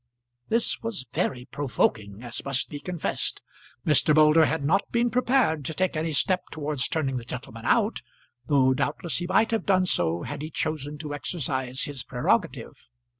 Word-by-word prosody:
This 230 +1 +2
was 225 - -4
very 125 -2 -1
provoking, 110 -6 -1
as 120 -1 -3
must 140 -1 0
be 145 - -5
confessed. 175 +1 -3 0.5
Mr. 150 0 +4
Moulder 155 +1 +6
had 150 +2 -1
not 190 +7 +1
been 235 0 +1
prepared 245 - +2
to 160 - -3
take 185 -2 0
any 160 +1 -1
step 180 +5 +2
towards 150 -3 -1
turning 135 -5 -1
the 120 - -5
gentleman - - -8
out, - - +2 0.5
though 130 -3 +4
doubtless 145 +5 -1
he 175 - -3
might 220 +5 +3
have 225 - -1
done 185 -2 +4
so 85 - 0
had 145 0 -5
he 155 - -5
chosen 150 -2 -3
to 150 -1 -6
exercise 130 -4 -2
his 140 -4 -4
prerogative. 125 -1 -1
150 Hz, 170 wpm, -26 LUFS, 130-180 Hz, 0.5 s, Moulder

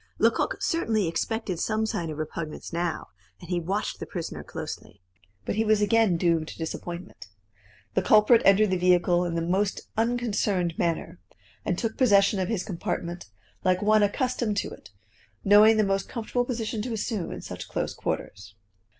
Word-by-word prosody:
Lecoq - - +2
certainly 225 - +1
expected 190 +1 -2
some 220 0 0
sign 170 -6 -2
of 155 - -5
repugnance 155 +1 -5
now, 170 -1 -2 0.3
and 170 - -10
he 175 - +1
watched 195 +5 -2
the - - -6
prisoner 170 -3 -5
closely. - - -7 0.5
But - - -1
he 220 - +3
was 215 -1 +3
again 210 -3 +3
doomed 165 -2 +1
to - - -9
disappointment. 170 - -6 0.7
The - - +2
culprit 215 +2 +5
entered 200 +1 +5
the 185 - +1
vehicle 180 0 +3
in 170 -1 -2
the 165 - 0
most 190 +4 0
unconcerned 220 -6 0
manner, 165 - -1 0.4
and 180 - -1
took 225 +1 -2
possession 200 -5 +4
of 185 - 0
his 215 -5 -1
compartment 175 -1 -4 0.4
like 185 +1 +2
one 215 +1 +4
accustomed 225 0 0
to - - -1
it, - - -12 0.5
knowing 210 +2 +7
the 215 - +4
most 195 -1 -1
comfortable 245 +1 -2
position 225 -3 -3
to 240 +2 -3
assume 215 -3 -3
in - - -6
such - - -7
close - - -2
quarters. 95 +1 -5
195 Hz, 165 wpm, -26 LUFS, 175-220 Hz, 0.7 s, knowing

